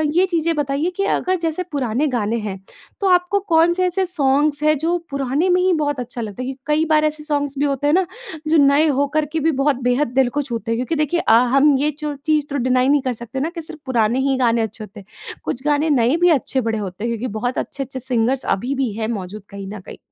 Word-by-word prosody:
ये 365 +2 +5
चीज़ें 335 -2 0
बताइए 290 +3 -1
कि 395 - +1
अगर 370 0 0
जैसे 330 +2 -1
पुराने 265 +1 0
गाने 225 0 0
हैं 190 -1 -5 0.4
तो 395 - +2
आपको 360 +2 +3
कौन 330 +1 +5
से 370 +1 0
ऐसे 375 +1 0
सॉन्ग्स 290 -3 +1
हैं 305 0 +3
जो 335 +5 0
पुराने 275 +6 0
में 360 0 +3
ही 370 0 +3
बहुत 290 -4 -1
अच्छा 245 0 -5
लगता 210 +1 -6
है? - - -4
कि 270 - -10
कई 305 +2 +2
बार 305 -1 +3
ऐसे 305 0 -2
सॉन्ग्स 285 -2 -1
भी 290 - +2
होते 280 0 0
हैं 295 - +3
ना 375 0 +3 0.4
जो 320 +1 +3
नए 285 +2 +5
हो 285 0 +1
कर 310 - +2
के 320 - -1
भी 320 +2 +2
बहुत 275 0 +1
बेहद 250 +4 +2
दिल 260 -2 +4
को 290 +3 -1
छूते 235 -4 -4
हैं। 230 - 0
क्योंकि 255 +7 -2
देखिए 305 +3 0
अ, 220 - +3 0.2
हम 275 +1 +5
ये 300 +2 +1
चो 300 0 -5
चीज़ 305 -2 +2
तो 285 - -4
डिनाई 255 0 +2
नहीं 290 0 +4
कर 260 -1 -2
सकते 235 +3 -6
ना 305 +5 -1
कि 335 - -4
सिर्फ़ 315 0 -9
पुराने 240 -1 +1
ही 270 - +2
गाने 235 -2 +2
अच्छे 220 0 -4
होते 210 0 -11
हैं। 195 - -14 0.4
कुछ 255 - -4
गाने 295 +1 +2
नए 255 -1 +3
भी 355 - +6
अच्छे 260 +1 -2
बड़े 225 -1 -1
होते 200 -1 -6
हैं 235 - -1
क्योंकि 235 +2 -3
बहुत 245 +3 -2
अच्छे-अच्छे 270 -1 -4
सिंगर्स 255 +1 0
अभी 250 +7 -3
भी 265 -4 -1
है 220 -1 -2
मौजूद 205 -2 -5
कहीं 195 -1 -8
न 210 - -7
कहीं। - - -11
280 Hz, 255 wpm, -20 LUFS, 245-310 Hz, 0.4 s, भी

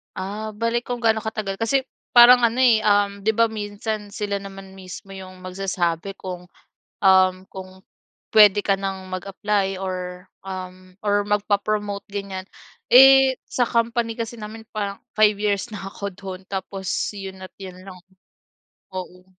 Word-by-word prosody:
Ah, 210 +3 -5
bale 230 +2 -1
kung 245 -1 -4
gaano 220 -1 +3
katagal, 210 -3 -3
kasi 265 +4 +1 0.3
parang 240 0 +9
ano, 235 +3 +1
eh, 230 -4 +4
um, 205 -1 +2
di 220 - +3
ba 230 +1 +3
minsan 210 -1 -5
sila 205 -2 -2
naman 195 -1 -10
mismo 190 +1 -10
yung 185 -1 -10
magsasabi 185 -1 -2
kung, 180 -1 -6 0.6
um, 190 -1 +5
kung 190 0 -10 0.5
puwede 210 -1 +6
ka 195 -1 +1
ng 190 -1 -5
mag-apply 195 0 -2
or, 180 -1 -5 0.2
um, 185 -1 -8
or 205 0 +2
magpa-promote 205 0 -1
ganyan. 195 -2 -5 0.5
Eh, 270 0 +8
sa 245 - +1
company 230 0 0
kasi 230 0 -5
namin 220 +1 -9
parang 200 -2 -4 0.2
5 215 -1 +6
years 205 +1 -1
na 205 - -6
ako 200 0 -6
dun 190 0 -8
tapos 190 0 -5 0.3
yun 190 -2 -8
at 185 - -10
yun 185 -2 -10
lang 185 -2 -10 1.0
oo. 180 -1 -7
200 Hz, 145 wpm, -22 LUFS, 190-215 Hz, 1.0 s, parang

